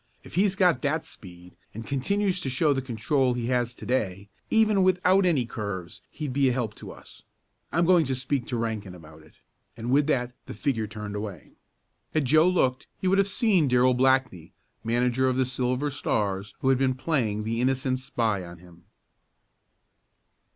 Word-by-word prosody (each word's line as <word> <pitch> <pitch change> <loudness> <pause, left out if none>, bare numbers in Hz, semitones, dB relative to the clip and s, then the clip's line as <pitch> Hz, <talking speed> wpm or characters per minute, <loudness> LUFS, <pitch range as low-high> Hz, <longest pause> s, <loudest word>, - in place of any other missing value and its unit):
"If - - -14
he's 190 +2 +2
got 180 -3 +3
that 155 +2 -1
speed, 90 -2 -12 0.2
and 115 +1 -7
continues 185 +7 -1
to 135 - -2
show 145 +3 +2
the 135 - -1
control 125 +1 0
he 120 -1 -3
has 120 -1 0
to - - -10
day, 100 -5 -2 0.2
even 215 -3 +3
without 185 +1 +3
any 145 -8 +2
curves 100 -6 -6
he'd 150 -5 -5
be 135 -1 +3
a - - +1
help 120 -4 -2
to - - -10
us. - - -14 0.5
I'm 170 +3 +2
going 170 -4 +4
to 130 - -1
speak 130 0 -2
to 120 - -2
Rankin 110 -5 -3
about 80 -2 -14
it," 80 - -21 0.4
and 115 +2 -4
with 145 +2 +3
that 125 -4 0
the - - -7
figure 115 -6 -1
turned 105 -1 -7
away. 105 -6 -7 0.6
Had 155 -3 +2
Joe 155 +6 +5
looked 130 -8 0
he 190 - -1
would 195 +2 +3
have 195 - +3
seen 200 - +2
Darrell 125 0 +4
Blackney, 130 -9 +1 0.3
manager 125 +3 +1
of 130 - -1
the 130 - +2
Silver 130 +2 -1
Stars, 100 -6 -2
who 135 - +2
had 130 -1 +3
been 130 -1 +1
playing 125 -8 -1
the 115 +2 -2
innocent 130 0 0
spy 110 -6 -1
on 85 0 -10
him. 85 0 -18
130 Hz, 185 wpm, -26 LUFS, 110-150 Hz, 0.6 s, Joe